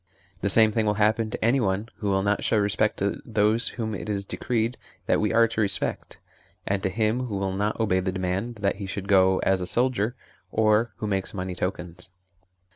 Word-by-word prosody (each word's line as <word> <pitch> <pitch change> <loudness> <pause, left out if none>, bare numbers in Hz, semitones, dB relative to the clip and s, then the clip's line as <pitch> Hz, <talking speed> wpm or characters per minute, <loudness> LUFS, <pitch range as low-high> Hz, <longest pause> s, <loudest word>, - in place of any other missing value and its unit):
The 100 - 0
same 110 +2 +6
thing 110 0 0
will 105 - +2
happen 110 +2 +1
to 110 - -3
anyone 110 -4 +1
who 105 - -2
will 95 0 +1
not 105 0 0
show 110 - +2
respect 100 -1 +1
to - - -2
those 105 +3 +3
whom 110 -2 -3
it 105 - -6
is 100 -1 -2
decreed 115 +3 -1 0.3
that - - +2
we 105 - +1
are 115 0 +5
to 110 -1 -2
respect, 100 - -1 0.5
and 100 0 -1
to 95 - 0
him 110 +5 0
who 105 -5 -4
will 95 -1 -2
not 105 +3 -1
obey 100 -5 +2
the 95 0 -2
demand 95 +5 -3
that 100 -1 0
he 100 -1 -6
should 100 +1 -5
go 95 -1 +4
as 95 -1 +2
a 90 - -3
soldier, 120 0 0 0.4
or 110 +1 +2
who - - -4
makes 95 -1 -2
money 95 -1 -4
tokens. 90 -1 -5
105 Hz, 205 wpm, -25 LUFS, 95-110 Hz, 0.5 s, same